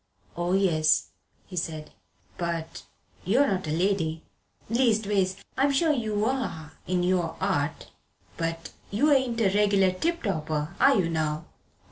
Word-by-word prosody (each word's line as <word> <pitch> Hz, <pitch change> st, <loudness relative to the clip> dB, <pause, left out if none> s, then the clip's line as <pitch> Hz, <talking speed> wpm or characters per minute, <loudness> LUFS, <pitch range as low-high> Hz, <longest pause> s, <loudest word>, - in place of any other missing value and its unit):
"Oh, 175 Hz, +1 st, -1 dB
yes," 165 Hz, -5 st, +3 dB, 0.4 s
he 185 Hz, -, -10 dB
said, 160 Hz, -3 st, -4 dB, 0.4 s
"but 170 Hz, -2 st, -4 dB, 0.4 s
you're 240 Hz, +10 st, +3 dB
not 190 Hz, -, -1 dB
a -, -, -2 dB
lady 165 Hz, -2 st, 0 dB, 0.4 s
leastways, 210 Hz, -5 st, +1 dB, 0.2 s
I'm 275 Hz, +2 st, +3 dB
sure 315 Hz, +3 st, +3 dB
you 215 Hz, -5 st, -1 dB
are 195 Hz, -, -2 dB, 0.2 s
in 180 Hz, -1 st, +1 dB
your 175 Hz, -3 st, +1 dB
'art 165 Hz, -6 st, -1 dB, 0.4 s
but 165 Hz, 0 st, -4 dB, 0.2 s
you 285 Hz, +10 st, +2 dB
ain't 260 Hz, -4 st, +2 dB
a 195 Hz, -3 st, +3 dB
regular 200 Hz, -2 st, +4 dB
tip 335 Hz, -, -2 dB
topper, 155 Hz, -4 st, -2 dB
are 275 Hz, -, +6 dB
you, 185 Hz, -5 st, +2 dB
now?" 160 Hz, -1 st, -2 dB
185 Hz, 135 wpm, -27 LUFS, 165-220 Hz, 0.4 s, are